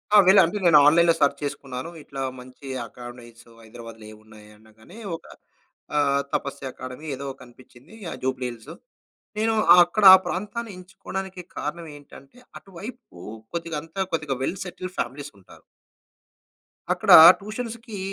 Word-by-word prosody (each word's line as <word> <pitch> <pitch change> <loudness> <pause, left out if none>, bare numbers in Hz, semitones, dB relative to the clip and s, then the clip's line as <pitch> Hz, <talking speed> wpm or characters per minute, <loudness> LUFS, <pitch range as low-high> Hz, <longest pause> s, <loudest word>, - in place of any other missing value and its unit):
ఆ! - - +9
వెళ్ళి 195 +1 +7
అంటే 170 +5 -2
నేను 165 -3 +7
ఆన్‌లైన్‌లో 170 +2 +5
సెర్చ్ 145 -2 +1
చేసుకున్నాను. 135 0 -6
ఇట్లా 135 -1 -8 0.2
మంచి 130 +2 -14 0.2
అకాడమీస్ 120 -1 -13 0.2
హైదరాబాద్‌లో 115 -1 -12
ఏమున్నాయి 110 0 -17
అనగానే, 110 - -18 0.2
ఒక - - -14 0.7
ఆహ్, 140 -1 +2
తపస్య 135 -1 -4
అకాడమీ 130 +5 -10
ఏదో 140 +1 -7
కనిపించింది. 125 - -18 0.2
ఆ! - - -5
జూబ్లీహిల్స్‌లో. 125 -3 -5 0.6
నేను 225 +1 +1 0.3
అక్కడ 175 +4 -1
ఆ - - +10
ప్రాంతాన్ని 210 +4 -5
ఎంచుకోవడానికి 190 0 -8
కారణం 165 +3 -5
ఏంటంటే, 145 - -17 0.2
అటు 195 - -21
వైపు 235 - -11 0.4
కొద్దిగా 165 -2 -4
అంత 165 +3 -18 0.2
కొద్దిగా 150 -4 -2
వెల్ 190 - -3
సెటిల్డ్ 185 0 -8
ఫ్యామిలీస్ 140 +2 -5
ఉంటారు. - - -19 1.3
అక్కడ - - 0 0.3
ట్యూషన్స్‌కి 225 0 -7
150 Hz, 130 wpm, -23 LUFS, 125-190 Hz, 1.3 s, ఆ